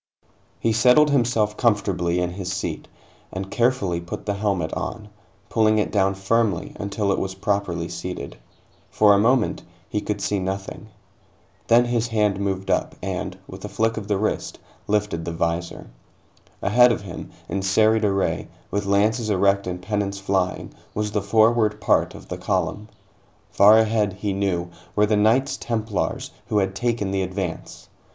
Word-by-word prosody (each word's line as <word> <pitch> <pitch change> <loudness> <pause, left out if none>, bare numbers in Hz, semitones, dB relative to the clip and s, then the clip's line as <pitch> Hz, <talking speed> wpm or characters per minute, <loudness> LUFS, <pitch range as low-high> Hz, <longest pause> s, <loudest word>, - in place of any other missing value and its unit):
He 115 - +1
settled 125 +7 +5
himself 115 -5 +2
comfortably 95 -6 +1
in 90 0 -1
his 95 0 -5
seat, 95 -1 -4 0.4
and 95 +1 -5
carefully 115 -8 +1
put 85 - -7
the 100 - 0
helmet 100 -5 -1
on, 105 -2 -5 0.4
pulling 110 -1 +3
it 105 - 0
down 95 -2 +2
firmly 100 -1 0
until 100 0 -1
it - - +1
was 95 0 -3
properly 95 -4 -1
seated. 90 -2 -6 0.5
For 105 -1 +5
a 100 - +4
moment, 120 +2 +2 0.3
he 105 - -2
could 105 -1 -3
see 100 0 -1
nothing. 95 +3 -5 0.8
Then 120 +1 +5
his 120 -1 0
hand 105 -4 +1
moved 95 -1 -2
up - - 0
and, 95 0 -4
with 95 0 -11
a 105 - -5
flick 115 +2 0
of 105 -3 -5
the 105 -2 +1
wrist, 110 +2 -2 0.3
lifted 105 -5 0
the 85 - -4
visor. 85 +1 -3 0.7
Ahead 125 +4 +6
of 115 - -1
him, 90 -3 -8 0.2
in 100 - -2
serried 110 +3 +3
array, 100 -2 0 0.2
with 100 0 -2
lances 110 +3 +2
erect 100 0 +2
and 90 0 -3
pennons 100 +1 -2
flying, 95 -2 -1 0.2
was 105 0 -1
the 105 - 0
forward 110 +1 +3
part 105 - +2
of - - -12
the - - -6
column. 105 +1 -2 0.6
Far 105 +2 +7
ahead, 110 -2 +2
he 100 +1 -3
knew, 90 -3 -1 0.2
were 105 - +4
the 105 0 +1
Knights 115 +7 +2
Templars, 110 -3 -2 0.2
who 105 - 0
had 95 -1 +1
taken 115 -2 -1
the 95 0 0
advance. 95 -2 -5
100 Hz, 160 wpm, -23 LUFS, 95-110 Hz, 0.8 s, Far